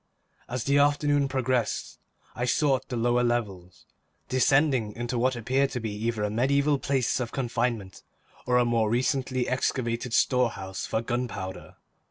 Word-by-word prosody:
As 125 -1 -3
the 140 +1 +3
afternoon 145 0 +3
progressed, 130 -4 -1 0.3
I 120 - -2
sought 135 0 +1
the 125 - -3
lower 120 +1 +2
levels, 95 -9 -3 0.4
descending 130 -3 +2
into 120 +1 -3
what 130 +1 +2
appeared 130 +4 +1
to 125 - -2
be 110 -2 -4
either 110 +1 -2
a 105 - -1
mediaeval 140 +5 +2
place 135 -3 0
of 120 -2 -3
confinement, 115 -6 -2 0.5
or 125 0 +3
a 125 - +4
more 115 -2 +1
recently 130 +1 0
excavated 125 -2 -1
storehouse 110 -7 0
for 110 - -1
gunpowder. 115 -6 -4
125 Hz, 145 wpm, -27 LUFS, 115-130 Hz, 0.5 s, a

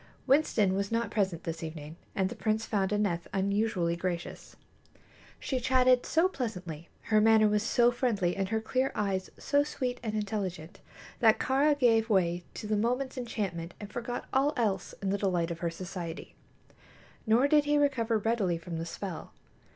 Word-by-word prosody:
Winston 245 -9 +3
was 200 +2 -2
not 230 0 0
present 190 -6 -1
this 165 -1 -4
evening, 155 -1 -7 0.2
and 190 -1 +1
the - - -6
prince 220 0 -1
found 195 -3 0
Aneth 205 -5 0
unusually 195 -3 0
gracious. 175 0 -5 0.8
She 260 - -2
chatted 255 0 +3
so 330 +3 +3
pleasantly, 180 - -5 0.2
her 215 - +6
manner 220 0 +5
was 210 0 +2
so 240 +2 +3
friendly 220 -8 0
and 195 -1 -2
her 220 0 0
clear 255 +4 0
eyes 195 -3 -1
so 285 0 +2
sweet 255 -4 -3
and 215 -2 -3
intelligent, 195 -5 -4 0.4
that 225 -3 +5
Kāra 285 +3 +2
gave 225 -4 +3
way 175 -4 +2
to - - -6
the 210 0 0
moment's 250 +5 0
enchantment 195 -9 -4
and 210 0 -9
forgot 245 0 -4
all 275 +3 +3
else 200 -6 -1
in 190 - 0
the 200 - 0
delight 180 -4 0
of 170 - -5
her 170 - -1
society. 170 -1 -7 0.9
Nor 235 +5 +4
did 295 0 +4
he 295 0 +2
recover 250 -6 +2
readily 210 -5 0
from 165 0 -6
the 165 - -4
spell. 180 -1 -6
210 Hz, 170 wpm, -30 LUFS, 180-240 Hz, 0.9 s, her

